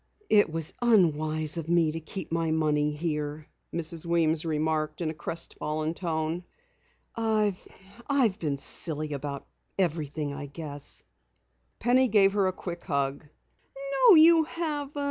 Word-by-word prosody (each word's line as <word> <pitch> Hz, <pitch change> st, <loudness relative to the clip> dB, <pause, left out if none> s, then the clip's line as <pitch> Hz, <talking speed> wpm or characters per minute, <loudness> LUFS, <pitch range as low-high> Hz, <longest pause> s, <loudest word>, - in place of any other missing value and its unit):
"It 205 Hz, -6 st, +5 dB
was 160 Hz, -1 st, -1 dB
unwise 155 Hz, -8 st, +2 dB
of 165 Hz, -1 st, -5 dB
me 170 Hz, -2 st, +3 dB
to 165 Hz, -, -5 dB
keep 165 Hz, +2 st, -7 dB
my 165 Hz, -1 st, 0 dB
money 150 Hz, -2 st, +1 dB
here," 150 Hz, -1 st, -3 dB, 0.3 s
Mrs. 165 Hz, -1 st, -2 dB
Weems 165 Hz, -2 st, +1 dB
remarked 155 Hz, -1 st, -1 dB
in 165 Hz, -3 st, -1 dB
a -, -, -7 dB
crestfallen 155 Hz, 0 st, -3 dB
tone. 165 Hz, 0 st, -2 dB, 0.7 s
"I 215 Hz, -3 st, +1 dB, 0.5 s
I've 245 Hz, -8 st, +2 dB
been 145 Hz, -5 st, -1 dB
silly 155 Hz, +1 st, -2 dB
about 140 Hz, 0 st, -5 dB, 0.3 s
everything, 155 Hz, -5 st, -1 dB
I 145 Hz, 0 st, -6 dB
guess." 145 Hz, -1 st, -1 dB, 0.7 s
Penny 255 Hz, +2 st, +3 dB
gave 200 Hz, -4 st, +4 dB
her 200 Hz, -2 st, +2 dB
a -, -, +1 dB
quick 175 Hz, -2 st, -7 dB
hug. 140 Hz, +1 st, -1 dB, 0.8 s
"No, 400 Hz, -, +10 dB
you 325 Hz, 0 st, +7 dB
haven't. 300 Hz, -3 st, -4 dB
160 Hz, 135 wpm, -27 LUFS, 150-195 Hz, 0.8 s, No